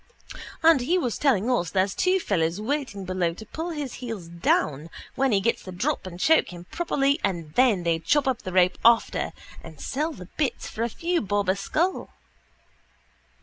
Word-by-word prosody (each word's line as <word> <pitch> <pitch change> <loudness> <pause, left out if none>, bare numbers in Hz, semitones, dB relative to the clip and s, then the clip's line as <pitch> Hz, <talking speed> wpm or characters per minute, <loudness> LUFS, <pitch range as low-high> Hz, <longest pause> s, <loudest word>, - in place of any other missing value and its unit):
And 320 -4 +6
he 335 +9 +1
was 250 - -2
telling 245 -7 +2
us 175 -9 +1
there's 190 +1 +1
two 370 +1 +2
fellows 175 - 0
waiting 230 -5 -3
below 180 -2 -1
to 220 - -10
pull 325 +9 -5
his 295 -6 -4
heels 220 -9 -6
down 165 -3 0 0.2
when 270 -1 +1
he 200 - +3
gets 230 +4 0
the 185 - -9
drop 180 +1 -2
and 175 -1 -9
choke 320 +11 +4
him 175 0 -10
properly 285 -4 +1
and 170 -6 -2
then 235 -8 +3
they 165 -1 +1
chop 290 - +1
up 255 -2 0
the 185 - -6
rope 180 0 +3
after 230 0 +3 0.3
and - - -12
sell 300 +4 -2
the 185 - -10
bits 280 -6 -1
for 220 - -6
a 235 - 0
few 340 +8 -1
bob 205 -1 -1
a 190 - +3
skull. 325 - -1
220 Hz, 190 wpm, -25 LUFS, 185-285 Hz, 0.3 s, And